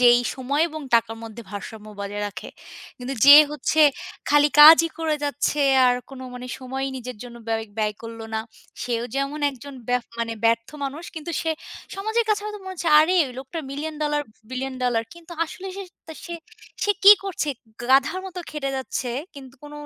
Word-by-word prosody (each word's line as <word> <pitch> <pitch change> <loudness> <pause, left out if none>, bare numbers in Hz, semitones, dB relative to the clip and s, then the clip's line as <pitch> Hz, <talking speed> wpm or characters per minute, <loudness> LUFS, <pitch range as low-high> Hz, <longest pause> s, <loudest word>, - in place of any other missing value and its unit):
যেই 240 -1 +7 0.2
সময় 280 +4 0
এবং 310 -1 -7
টাকার 225 -1 +2
মধ্যে 225 +1 -9
ভারসাম্য 210 +1 -8
বজায় 205 +1 -4
রাখে। 205 - -9 0.5
কিন্তু 255 +2 -5
যে 285 - +12 0.2
হচ্ছে 300 +1 -2 0.5
খালি 295 0 +5
কাজই 320 +2 +10
করে 320 -1 0
যাচ্ছে, 290 +1 -1 0.3
আর 250 - +4 0.2
কোনো 265 -1 -9
মানে 250 0 -7
সময়ই 265 +1 -4
নিজের 250 -1 -7
জন্য 240 -1 -10
ব্য 225 - -1 0.3
ব্যয় 210 -1 0
করল 230 0 -8
না, 220 - 0 0.4
সেও 235 -1 -2
যেমন 275 +2 -2
একজন 275 +1 -11
ব্যফ 250 -1 +1
মানে 230 -1 -2
ব্যর্থ 230 0 +2 0.2
মানুষ। 285 +5 -5
কিন্তু 320 +1 -6
সে 325 - -1 0.4
সমাজের 440 +4 0
কাছে 425 -1 +2
হয়তো 420 0 -5
মনে 375 0 -7
হচ্ছে, 335 -1 -2
"আরে 330 +4 +3
ওই 255 - -9
লোকটার 275 +5 -6
মিলিয়ন 305 +3 -5
ডলার, 295 0 0 0.3
বিলিয়ন 260 +1 -4
ডলার।" 240 -2 +1
কিন্তু 340 0 -13
আসলে 370 +4 -9
সে 395 - -5 0.2
তা 320 - -8
সে, 345 - -6 0.5
সে 410 - +2
কী 400 - +12
করছে? 370 -6 -3 0.4
গাধার 275 +7 +4
মতো 370 -1 -8
খেটে 285 -3 -3
যাচ্ছে। 260 -1 -3 0.3
কিন্তু 265 -2 -12
কোন 295 0 -11
275 Hz, 180 wpm, -23 LUFS, 245-315 Hz, 0.5 s, যে